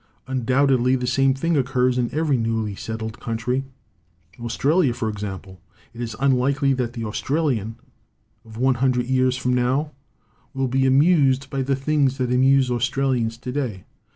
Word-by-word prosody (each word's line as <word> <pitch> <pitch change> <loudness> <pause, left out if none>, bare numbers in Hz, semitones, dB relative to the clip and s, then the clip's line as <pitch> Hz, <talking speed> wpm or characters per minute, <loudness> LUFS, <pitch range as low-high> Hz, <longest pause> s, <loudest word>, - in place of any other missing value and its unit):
Undoubtedly 130 0 +2
the 125 -1 -2
same 135 +1 +2
thing 165 +5 0
occurs 125 -2 +1
in 120 -1 -1
every 155 -2 +1
newly 115 -3 -1
settled 110 +2 -6
country 125 +3 -2 0.7
Australia, 135 +4 +1
for 120 -2 -3
example. 95 -3 -7 0.3
It 120 - -8
is 115 -3 -4
unlikely 135 +1 +2
that 125 -2 -2
the 115 -2 -5
Australian 115 -2 -1 0.7
of 110 0 -13
one 130 +2 +3
hundred 125 -2 +2
years 130 0 +1
from 125 0 -1
now 130 +5 0 0.6
will 135 0 0
be 130 +1 +1
amused 140 -1 +3
by 135 - -1
the 135 +1 0
things 135 -1 +1
that 125 -2 -1
amuse 130 0 +3
Australians 125 -2 0
to 125 +1 -6
day. 125 -9 -3
130 Hz, 155 wpm, -22 LUFS, 120-135 Hz, 0.7 s, one